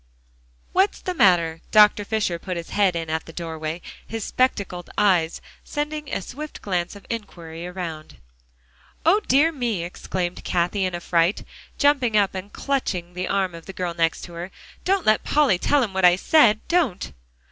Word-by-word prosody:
"What's 385 +2 +2
the 365 - -3
matter?" 170 - +3
Dr. 210 -1 +6
Fisher 205 -5 -1
put 180 0 -4
his 170 - -7
head 195 -4 +2
in 165 -1 -3
at 160 0 -2
the - - -8
doorway, 160 0 -5 0.2
his 225 -1 -4
spectacled 200 -8 -1
eyes 175 -5 +2 0.2
sending 300 0 -4
a - - -2
swift 300 +8 -8
glance 180 -1 -2
of 200 - -13
inquiry 170 -7 -6
around. 170 -4 -7 0.9
"O 365 +6 +5
dear 290 +6 +4
me!" 240 - -2
exclaimed 175 0 -4
Cathie 180 +3 0
in 185 -1 -2
a - - -4
fright, 170 +2 +1 0.3
jumping 270 -7 +3
up 200 -2 +3
and 190 +2 -6
clutching 185 -11 -2
the 180 +1 -3
arm 190 -3 0
of 165 -1 -11
the 195 - -7
girl 180 -2 -3
next 165 -1 0
to 175 - -9
her. 170 +2 -6 0.3
"Don't 385 -1 +1
let 215 0 +3
Polly 280 -12 +3
tell 285 +5 +3
him 205 -5 -3
what 190 0 -1
I 175 0 +7
said 220 0 +4
don't." 300 - 0
190 Hz, 175 wpm, -23 LUFS, 175-235 Hz, 0.9 s, I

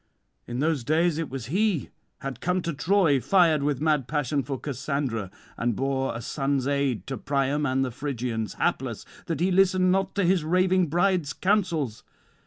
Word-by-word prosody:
In 120 +2 -3
those 155 -4 +1
days 160 +4 +2
it 165 - -3
was 130 -3 -5
he 190 - 0 0.3
had 135 -3 -5
come 180 0 0
to 170 - -2
Troy, 160 -1 +3
fired 160 - +3
with 145 -2 0
mad 150 -5 +1
passion 145 -1 0
for 135 0 -5
Cassandra, 135 -7 -3 0.3
and 120 -1 0
bore 135 0 -1
a 115 - -5
son's 135 +1 -1
aid 140 -8 0
to 135 - -4
Priam 140 +2 0
and 135 0 +1
the 130 - -4
Phrygians: 120 -5 -3
hapless, - - -1 0.2
that 165 - -2
he 180 +3 +2
listened 185 0 +4
not 195 0 0
to 200 - +1
his 180 -2 +3
raving 185 +2 +2
bride's 175 -2 +1
counsels. 170 - 0
145 Hz, 175 wpm, -26 LUFS, 135-175 Hz, 0.3 s, listened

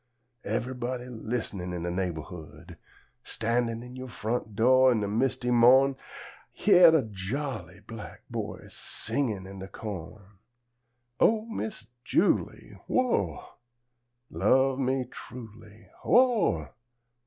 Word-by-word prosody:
Ever'body 125 +3 -3
list'nin', 110 -6 -4
In 85 -1 -4
de 85 - -2
neighborhood! 90 -2 -6 0.4
Standin' 115 0 -1
in 125 +1 -10
yo' 130 0 -7
front 115 -2 -3
do' 130 +4 +5
In 115 -4 +2
de 100 - -1
misty 125 +3 0
mo'n, 130 +3 +6 0.6
Hyah 180 -4 +7
de 160 -4 +4
jolly 105 - -5
black 110 +1 -10
boy, - - -5
Singin' 110 -9 -2
in 95 0 -9
de 95 - -7
co'n: 95 -3 -7 1.0
"O 220 0 +3
Miss 220 - -5 0.2
Julie, 190 - 0
Who 100 - +1
ah! - - -14 0.8
Love 130 0 +3
me 130 -1 0
truly, 110 -4 -12 0.2
Who - - +4 0.5
ah! - - -14
115 Hz, 115 wpm, -28 LUFS, 100-130 Hz, 1.0 s, Hyah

